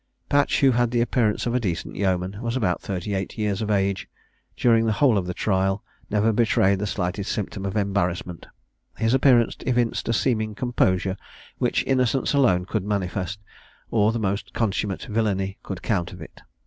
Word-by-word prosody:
Patch, 145 0 +2
who 135 -1 +6
had 120 0 +2
the 120 0 0
appearance 120 -3 +1
of 120 - -1
a 125 - +2
decent 90 -8 -3
yeoman, 95 -1 0
and 100 - -9
was 120 0 -2
about 90 -8 0
thirty 100 +1 -4
eight 95 +2 -3
years 105 -2 -1
of 110 - -2
age, 100 -2 0 0.5
during 115 -2 +3
the 110 - +2
whole 120 +2 +4
of 95 -3 0
the 90 - -2
trial 95 0 0 0.3
never 105 +2 +2
betrayed 100 -4 +3
the 105 - -2
slightest 95 +1 -2
symptom 100 -1 -3
of 95 - -3
embarrassment: 90 -4 -1 0.5
his 115 +2 +1
appearance 125 -3 +4
evinced 120 -3 0
a - - +2
seeming 110 -3 0
composure, 95 -6 0 0.4
which - - +1
innocence 130 0 +1
alone 110 -11 +3
could 105 +1 -2
manifest, 100 0 -2 0.5
or 110 -1 +3
the 115 - -2
most 100 -1 -2
consummate 100 -3 -1
villany 100 -3 -1
could 95 -3 -7
counterfeit. 90 -5 -3
105 Hz, 175 wpm, -24 LUFS, 95-115 Hz, 0.5 s, who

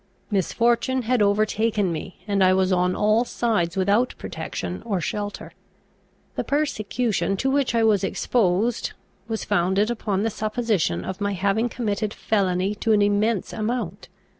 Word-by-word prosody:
Misfortune 235 +6 +1
had 245 0 +1
overtaken 210 -1 +2
me, 165 +3 -6
and 200 -2 +2
I 185 0 +5
was 190 0 +2
on 180 0 +2
all 215 +3 +3
sides 210 -8 -1
without 205 +6 +2
protection - - -5
or 205 -5 -1
shelter. 205 +5 -4 0.8
The - - -1
persecution 235 -7 -1
to 265 +6 0
which 275 -3 +1
I 230 - +3
was 210 -3 +3
exposed 210 +2 0 0.3
was 225 -1 -3
founded 195 +3 +1
upon 205 -4 -1
the 225 - 0
supposition 215 - -1
of 190 +2 -5
my 200 0 0
having 200 +5 +1
committed 215 -3 -2
felony 190 -2 0
to 225 - +3
an 205 -1 +4
immense 205 0 +1
amount. 235 +3 -3
210 Hz, 145 wpm, -24 LUFS, 195-230 Hz, 0.8 s, I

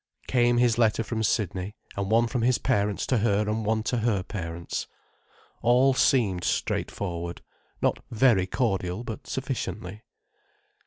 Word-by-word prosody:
Came 120 -1 +3
his 120 -1 +3
letter 115 -1 +3
from 110 0 -3
Sydney, 100 -2 -1 0.2
and 100 -1 -2
one 115 +2 +4
from 120 +1 -2
his 125 +1 +3
parents 105 -6 0
to 125 - +1
her 105 -1 +1
and 110 +1 -1
one 110 +1 0
to 125 - -1
her 110 -5 +1
parents. 85 -4 -5 0.7
All 125 +3 +4
seemed 105 -9 +2
straightforward—not 85 -3 -3
very 115 -5 +3
cordial, 95 -3 -1
but 115 -2 -7
sufficiently. 110 -6 -4
110 Hz, 135 wpm, -26 LUFS, 100-120 Hz, 0.7 s, one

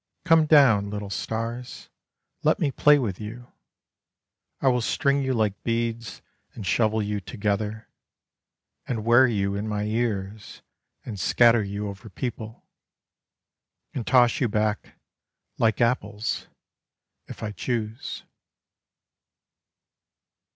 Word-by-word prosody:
Come 165 -3 +5
down, 125 -10 +5
little 105 -1 -5
stars, 115 +4 -4 0.5
let - - +3
me 140 - +1
play 150 +2 +5
with 110 -8 -3
you: 120 +4 -9 1.1
I 135 - 0
will 125 -1 +3
string 140 +4 +1
you 130 -1 -1
like 105 -3 0
beads, 115 0 -3 0.3
and 110 - -7
shovel 110 +3 +1
you 105 0 -2
together, 105 +2 -3 1.0
And 110 -3 -3
wear 120 +3 +6
you 100 -4 0
in 100 +2 -3
my 105 -1 -2
ears, 105 -2 -3 0.4
and 105 -5 -6
scatter 115 +4 +4
you 100 +1 -4
over 100 +2 -9
people 110 +1 -6 1.3
And 120 - -4
toss 125 -2 +4
you 125 - +2
back, 105 -1 -2 0.6
like 110 -1 +2
apples, 115 -3 -1 0.8
if - - -9
I 105 - -3
choose. 110 +2 -4
110 Hz, 115 wpm, -25 LUFS, 105-120 Hz, 1.3 s, wear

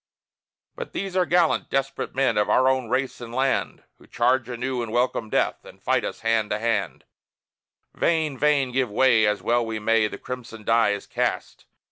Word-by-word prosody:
But 485 -1 -7
these 195 -2 -4
are 185 -1 +2
gallant, 175 -2 +2
desperate 135 -2 -2
men, 135 -4 +2
of 105 0 +1
our 130 - +4
own 130 -3 +1
race 130 +1 -1
and 115 -1 -8
land. 130 +2 -1 0.2
Who - - -19
charge 125 -1 +1
anew, 125 +1 -3
and 115 -2 -5
welcome 120 -2 0
death, - - 0
and - - -15
fight - - 0
us - - -5
hand 115 -2 +1
to 105 - 0
hand: 105 - -2 0.9
Vain, 160 -4 0
vain! 140 -1 +2
give 130 -1 0
way, 110 0 +4
as 105 0 -1
well 120 -1 +1
ye 110 - -2
may 110 0 +2
the - - -8
crimson 115 -3 -8
die 115 0 +3
is 100 - -6
cast! - - -3
125 Hz, 185 wpm, -24 LUFS, 115-135 Hz, 0.9 s, our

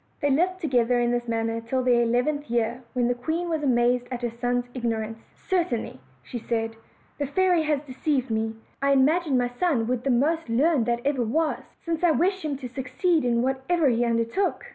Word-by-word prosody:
They 285 - +1
lived 365 +6 +1
together 245 -6 +2
in 240 0 +1
this 240 0 -1
manner 225 0 -1
till 255 +3 -1
their 245 -1 +4
eleventh 250 +5 0
year, 235 +1 0
when 245 -2 +1
the 245 - +2
queen 320 +8 -3
was 320 -2 -1
amazed 245 -2 +2
at 250 -1 -5
her 240 - -1
son's 245 +1 -1
ignorance. 225 -3 -3 0.2
"Certainly," 340 - -2 0.2
said 225 - -3
she, 225 - -22 0.4
"the 285 - -1
fairy 360 +2 +2
has 300 -2 0
deceived 265 -2 -1
me. 220 0 -1 0.3
I 280 0 +3
imagined 290 +2 +3
my 245 -1 +1
son 295 -11 +2
would 245 +1 -1
the 275 - 0
most 295 +4 +1
learned 260 +1 +2
that 235 0 0
ever 275 -3 +1
was, 305 +8 -1 0.2
since 335 0 -2
I 350 - +5
wished 375 +4 +1
him 300 -2 -2
to 260 - -6
succeed 265 +7 0
in 240 -1 +1
whatever 265 +4 +1
he 240 0 +2
under 230 -1 +1
took." 380 +12 -1
255 Hz, 200 wpm, -25 LUFS, 235-305 Hz, 0.4 s, I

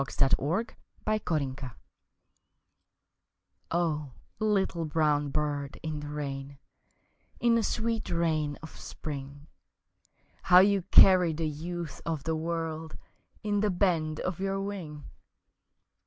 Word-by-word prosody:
Little 145 +9 +1 0.4
Brown 160 -11 0
Bird 130 -1 -7 2.0
O 155 -5 -1 0.3
LITTLE 195 -6 +1
brown 150 -2 +1
bird 145 -1 -2
in 155 -2 -3
the 150 - -6
rain, 140 -1 -5 0.8
In 235 -1 +4
the 230 - +4
sweet 225 +1 -1
rain 155 -4 0
of 160 - -8
spring, 140 -1 -7 1.0
How 180 - +6
you 195 +1 +6
carry 180 -4 +7
the 160 +1 -1
youth 165 0 -5
of 160 -4 -3
the 160 0 0
world 160 -1 -3 0.5
In 205 -1 +1
the 210 0 +2
bend 170 -5 +1
of 185 -1 -3
your 195 0 -1
wing! 180 -7 -5
160 Hz, 110 wpm, -29 LUFS, 150-185 Hz, 2.0 s, carry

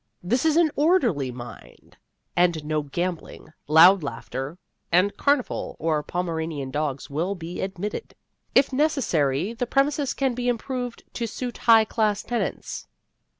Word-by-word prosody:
This 245 - 0
is 315 -1 +3
an 335 -3 +4
orderly 255 - +2
mind, 120 0 -11 0.4
and 170 -3 +2
no 155 0 0
gambling, 170 +2 -5
loud 170 +5 +7
laughter 135 +3 -5 0.3
and 185 +4 +3
carnival 280 -3 0
or 155 -1 0
Pomeranian 160 -5 -3
dogs 145 -1 -2
will 170 +7 -1
be 170 -1 -6
admitted. 195 - -5 0.4
If 270 0 +4
necessary, 210 - +1
the 240 +1 -3
premises 280 +1 +1
can 270 -2 +1
be 245 0 -1
improved 245 0 -3
to 235 - -2
suit 245 +2 -5
high 225 -1 +8
class 215 -2 0
tenants. 235 -6 -3
190 Hz, 135 wpm, -25 LUFS, 155-245 Hz, 0.4 s, high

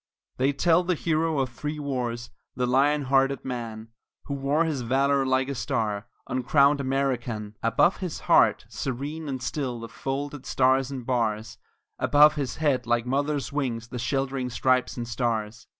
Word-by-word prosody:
They 135 +2 +2
tell 165 +5 +3
the 180 0 0
hero 160 0 0
of 135 -2 0
three 150 +6 -5
wars, 125 -5 -3 0.2
the 125 - 0
lion 140 +4 +3
hearted 135 0 +2
man, 115 -3 -5 0.4
Who 140 - -4
wore 140 +3 +1
his 150 -5 -2
valor 135 +3 +2
like 130 0 +2
a 140 - -2
star 105 -3 -2 0.2
uncrowned 140 +3 +3
American; 125 -6 -2
Above 115 +10 +3
his 180 -4 -5
heart - - +4
serene 145 +4 -4
and 130 -3 -4
still 125 -3 -3
the 115 - -7
folded 140 +2 -5
Stars 130 0 +2
and 130 -3 -6
Bars, 115 -3 -1 0.4
Above 150 +1 +6
his 140 -4 -3
head 140 -6 0
like 120 0 +1
mother 145 +3 0
wings, 120 -5 -2
the 125 - -5
sheltering 135 0 -1
Stripes 130 +1 +1
and 120 -1 -4
Stars. 115 -1 -2
130 Hz, 160 wpm, -26 LUFS, 120-140 Hz, 0.4 s, Above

